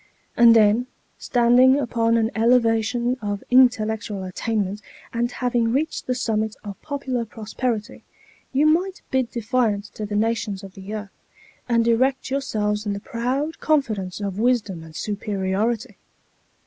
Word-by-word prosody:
And 235 -1 +7
then, 220 +3 +4 0.3
standing 245 +2 +4
upon 230 -4 +1
an 225 0 +1
elevation 235 +1 +2
of 205 -1 -3
intellectual 220 -5 +3
attainment, 205 +1 -2 0.3
and 240 +1 0
having 240 -2 0
reached 290 +6 -1
the 255 - 0
summit 220 -3 -1
of 200 -2 -8
popular 270 -5 -3
prosperity, 225 +1 -4 0.5
you 275 +3 +2
might 360 +5 +1
bid 260 -3 +1
defiance 225 -3 -1
to 215 - -6
the 205 - -4
nations 215 -2 -1
of 195 -1 -10
the 195 +1 -9
earth, 210 -2 -6 0.6
and 230 -1 +2
erect 260 +3 +1
yourselves 210 -6 -1
in 205 - 0
the 200 - -4
proud 255 +9 -3
confidence 215 -12 0
of 200 -1 -3
wisdom 220 -7 +1
and 160 -1 -13
superiority. 205 +3 -2
230 Hz, 135 wpm, -23 LUFS, 210-250 Hz, 0.6 s, And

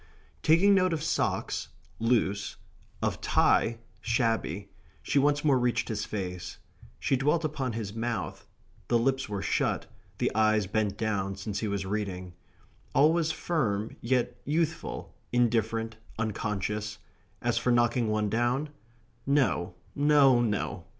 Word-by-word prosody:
Taking 175 +6 +5
note 185 -2 +3
of 155 -2 -2
socks 160 - -1 0.3
(loose), 110 -4 +1 0.5
of - - -1
tie 115 0 +3 0.2
(shabby), 115 -5 0 0.3
she 140 - +2
once 145 +1 +2
more 135 -4 +4
reached 120 -1 0
his 110 -2 -2
face. 90 -4 -5 0.4
She - - +1
dwelt 150 +5 +1
upon 140 -5 -2
his 105 -3 -4
mouth. 115 +1 -3 0.4
The 120 - +3
lips 130 0 0
were 100 -2 -3
shut. - - 0 0.3
The - - +1
eyes 110 -1 +3
bent 105 0 -1
down, 100 -3 -1
since 100 +1 -4
he 110 - -2
was 100 -1 -2
reading. 95 -3 -3 0.6
All 155 +3 +6
was 165 -2 +1
firm, 125 -11 -1
yet 120 0 0
youthful, 160 +3 -2 0.2
indifferent, 115 -2 +1 0.2
unconscious 105 -1 -2 0.4
as - - +1
for 125 - +1
knocking 120 0 +3
one 105 0 +1
down! 120 +7 0 0.6
No, 115 -11 +2 0.2
no, 140 -4 +5
no! 100 -5 -1
115 Hz, 130 wpm, -29 LUFS, 105-135 Hz, 0.6 s, All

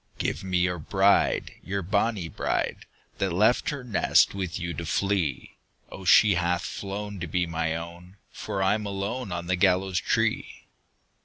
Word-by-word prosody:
"Give - - -2
me 95 -1 -1
your 90 -1 +1
bride, 95 +5 +2
your 100 0 -3
bonnie 100 0 0
bride, - - -2 0.3
That 95 -2 0
left 105 +8 +3
her 140 -4 -4
nest 120 -4 +3
with 95 -4 -4
you 85 0 -3
to 85 +2 -5
flee! 85 -2 -1 0.3
O, 95 - -9
she 105 +2 +6
hath 90 0 0
flown 100 0 -5
to 85 - -4
be 90 +3 0
my 80 -1 -2
own, 85 +3 -9
For 95 - -3
I'm 105 +2 +1
alone 100 +3 -4
on 85 0 -4
the 90 +1 +1
gallows 95 0 +2
tree!" 115 +1 -1
95 Hz, 160 wpm, -26 LUFS, 85-100 Hz, 0.3 s, she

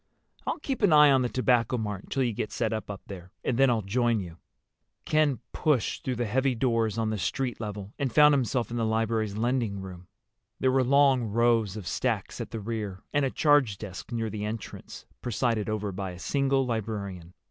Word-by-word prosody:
"I'll - - 0
keep 270 -4 -4
an 205 -5 +4
eye 150 -1 +8
on 135 -1 +4
the 125 - 0
Tobacco 125 -1 +2
Mart 105 -4 -4
until 135 - -1
you 120 -2 0
get 105 - -3
set 115 -2 -1
up 110 -1 -4 0.2
there, 90 -2 -10
and 125 - 0
then 135 -1 +6
I'll 115 -3 +1
join 115 +3 +1
you." 85 -3 -8 0.7
Ken 155 -5 +2
pushed 145 -8 0
through 130 - -1
the 120 0 -1
heavy 130 +4 +1
doors 115 -3 +1
on 110 -1 0
the 110 - -2
street 125 +6 -2
level 105 -2 -6
and 135 -3 0
found 150 +4 +7
himself 125 -3 0
in 120 - -2
the 115 - 0
library's 110 -2 0
lending 115 -3 0
room. 90 -2 -9 0.5
There 130 - +3
were 130 0 +3
long 135 -1 +4
rows 115 -2 +2
of 105 - -7
stacks - - -2
at - - -6
the 115 - -5
rear, 105 -3 -4
and 145 -1 +2
a - - +1
charge 145 -9 +3
desk 100 +3 -8
near 115 -2 -2
the 105 0 -4
entrance 105 +1 -7 0.2
presided 115 -2 0
over 105 -1 -2
by 95 -1 -5
a - - -10
single 135 +5 +1
librarian. 100 -6 -4
115 Hz, 200 wpm, -28 LUFS, 105-130 Hz, 0.7 s, eye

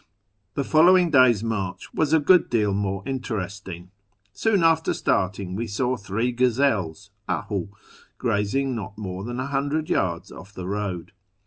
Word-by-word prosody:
The 140 - 0
following 175 +4 +5
day's 125 -6 +5
march 100 -5 -4
was 155 -2 +1
a 160 - +5
good 175 +4 +4
deal 105 -4 +1
more 100 -1 -2
interest 105 -7 -4
ing. 90 0 -8 0.4
Soon 210 -6 +1
after 165 0 +3
starting 95 0 -1
we 115 +3 -3
saw 125 +5 0
three 110 +3 -2
gazelles 115 - 0 0.2
{dhu) 100 -2 -2 0.5
grazing 130 +7 0
not 105 -1 -6
more 95 -3 -5
than 120 +3 -5
100 140 +4 -1
yards 85 -3 -1
off 100 +3 -12
the 90 -1 -6
road. 100 -2 -3
110 Hz, 145 wpm, -24 LUFS, 95-135 Hz, 0.5 s, following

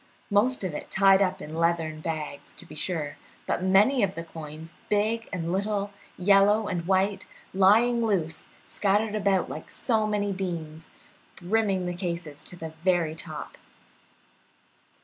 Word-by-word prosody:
Most 220 +4 +3
of 185 -4 -2
it - - -6
tied 195 0 +5
up 190 -1 0
in 155 - -8
leathern 165 -2 0
bags, 155 -3 -5
to - - -8
be - - -12
sure, 155 -2 -2 0.3
but - - -1
many 200 +8 +4
of 195 -2 +1
the 165 - -4
coins, 160 0 -9 0.2
big 220 +2 0
and 170 -2 -3
little, 200 +1 -1 0.3
yellow 200 +3 +4
and 175 -3 -3
white, 195 +1 +1 0.3
lying 225 +5 +4
loose 170 -7 -1
and - - -30
scattered 210 +2 +1
about 195 -3 +1
like 155 - -8
so 220 -3 +1
many 205 -1 0
beans, 165 -4 -5 0.5
brimming 195 0 0
the 175 - -2
cases 170 -5 -5
to - - -8
the 160 -2 -7
very 175 -4 +2
top. 160 - -8
190 Hz, 150 wpm, -27 LUFS, 165-205 Hz, 0.5 s, tied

